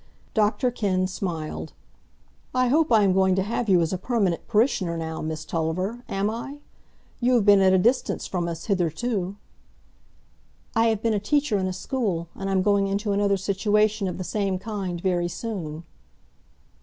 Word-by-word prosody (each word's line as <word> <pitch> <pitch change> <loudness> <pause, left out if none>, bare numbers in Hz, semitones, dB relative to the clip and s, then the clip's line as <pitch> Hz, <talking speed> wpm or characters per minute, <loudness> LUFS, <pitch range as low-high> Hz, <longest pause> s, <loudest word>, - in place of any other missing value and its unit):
Dr 220 +4 +2
Kenn 190 -6 0
smiled. 175 -4 -4 0.8
"I 255 -1 +3
hope 310 +2 +3
I'm 205 -4 +5
going 190 0 +3
to 190 - +1
have 225 +2 -2
you 180 -3 +5
as 165 +2 0
a 185 - -2
permanent 200 -6 0
parishioner 210 -7 +1
now, 160 -1 -4
Miss 155 0 -4
Tulliver; 185 +10 -2
am 195 +1 0
I? 235 +6 -5 0.6
You 250 +1 +3
have 225 -4 +3
been 200 -1 +7
at 190 -1 +5
a 190 - +5
distance 240 +8 +1
from 175 -2 -2
us 165 -1 -5
hitherto." 195 +1 -1 1.4
"I 225 +1 +4
have 220 -2 0
been 230 -1 +2
a 210 - +1
teacher 250 0 +1
in 185 - -1
a - - -2
school, 185 -5 -2
and 195 0 -5
I'm 190 -1 +2
going 200 -1 +3
into 200 +2 -1
another 200 0 +2
situation 205 +2 +1
of 180 - -4
the 185 - -4
same 195 +1 -1
kind 190 -3 -4
very 175 -1 0
soon." 175 -6 -5
195 Hz, 170 wpm, -25 LUFS, 180-220 Hz, 1.4 s, been